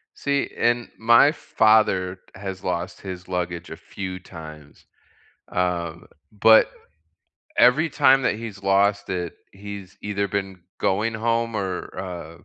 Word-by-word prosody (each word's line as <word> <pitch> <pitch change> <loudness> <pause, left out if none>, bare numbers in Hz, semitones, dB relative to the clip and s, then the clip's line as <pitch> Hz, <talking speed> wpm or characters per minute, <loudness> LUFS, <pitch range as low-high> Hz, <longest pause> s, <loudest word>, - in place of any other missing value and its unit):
See? 140 0 -1
And 120 0 +1
my 115 +6 +6
father 95 - +2
has 95 -1 -7
lost 90 +1 -3
his 95 -1 -8
luggage 85 -2 -3
a 80 - -6
few 95 -1 -6
times, 80 -5 -12 0.6
um, 85 -2 -2 0.3
but 110 +2 +6 0.9
every 140 +6 +5
time 135 0 +5
that 125 - +1
he's 105 -3 -8
lost 100 +1 +2
it, 90 -2 -3 0.2
he's 100 -1 -9
either 100 -1 -1
been 95 -2 -3 0.2
going 110 +4 0
home 115 +1 0
or, 95 -3 -4
uh 90 -4 -6
95 Hz, 125 wpm, -23 LUFS, 90-110 Hz, 0.9 s, my